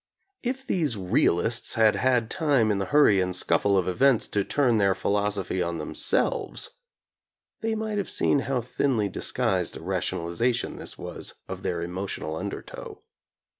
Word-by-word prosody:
If 265 Hz, +2 st, -3 dB
these 155 Hz, -, 0 dB
realists 95 Hz, +4 st, +2 dB
had 110 Hz, -1 st, +5 dB
had 125 Hz, -3 st, +1 dB
time 140 Hz, -9 st, +2 dB
in 100 Hz, -, 0 dB
the 100 Hz, -, -2 dB
hurry 135 Hz, -9 st, +5 dB
and 90 Hz, 0 st, -1 dB
scuffle 100 Hz, +2 st, +2 dB
of 95 Hz, -, +1 dB
events 120 Hz, +6 st, +3 dB
to 100 Hz, -, +1 dB
turn 120 Hz, -1 st, +2 dB
their 100 Hz, -2 st, +3 dB
philosophy 100 Hz, -2 st, -1 dB
on 85 Hz, -1 st, -2 dB
themselves, 75 Hz, -, 0 dB, 0.9 s
they 225 Hz, 0 st, -1 dB
might 215 Hz, -1 st, -2 dB
have 200 Hz, -, -3 dB
seen 140 Hz, -, +2 dB
how 135 Hz, -2 st, -1 dB
thinly 125 Hz, -2 st, 0 dB
disguised 95 Hz, -3 st, -1 dB
a -, -, -10 dB
rationalization 115 Hz, +9 st, -1 dB
this -, -, -8 dB
was -, -, -5 dB
of -, -, -6 dB
their 85 Hz, -1 st, -2 dB
emotional 90 Hz, -3 st, -4 dB
undertow. -, -, -7 dB
110 Hz, 150 wpm, -26 LUFS, 95-135 Hz, 0.9 s, had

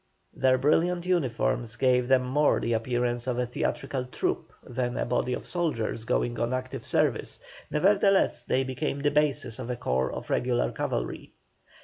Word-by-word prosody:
Their 130 Hz, -1 st, +3 dB
brilliant 170 Hz, +5 st, +2 dB
uniforms 125 Hz, -8 st, 0 dB
gave 125 Hz, -1 st, +2 dB
them 130 Hz, -1 st, +4 dB
more 145 Hz, +4 st, +3 dB
the 115 Hz, -, -1 dB
appearance 120 Hz, +1 st, 0 dB
of 125 Hz, -1 st, 0 dB
a 125 Hz, -, +1 dB
theatrical 125 Hz, +1 st, -2 dB
troupe 125 Hz, -, -2 dB
than 125 Hz, 0 st, -3 dB
a -, -, 0 dB
body 125 Hz, +1 st, 0 dB
of -, -, -8 dB
soldiers 115 Hz, -10 st, -2 dB
going 120 Hz, 0 st, 0 dB
on 120 Hz, +2 st, 0 dB
active 130 Hz, 0 st, -5 dB
service; -, -, 0 dB, 0.3 s
nevertheless 195 Hz, +4 st, +3 dB
they 130 Hz, -, 0 dB
became 135 Hz, +2 st, -3 dB
the 145 Hz, 0 st, +2 dB
basis 145 Hz, -5 st, 0 dB
of 125 Hz, -1 st, -5 dB
a 125 Hz, -, -1 dB
corps 65 Hz, -, 0 dB
of -, -, -6 dB
regular 125 Hz, -1 st, +1 dB
cavalry. -, -, -3 dB
130 Hz, 160 wpm, -27 LUFS, 120-145 Hz, 0.3 s, them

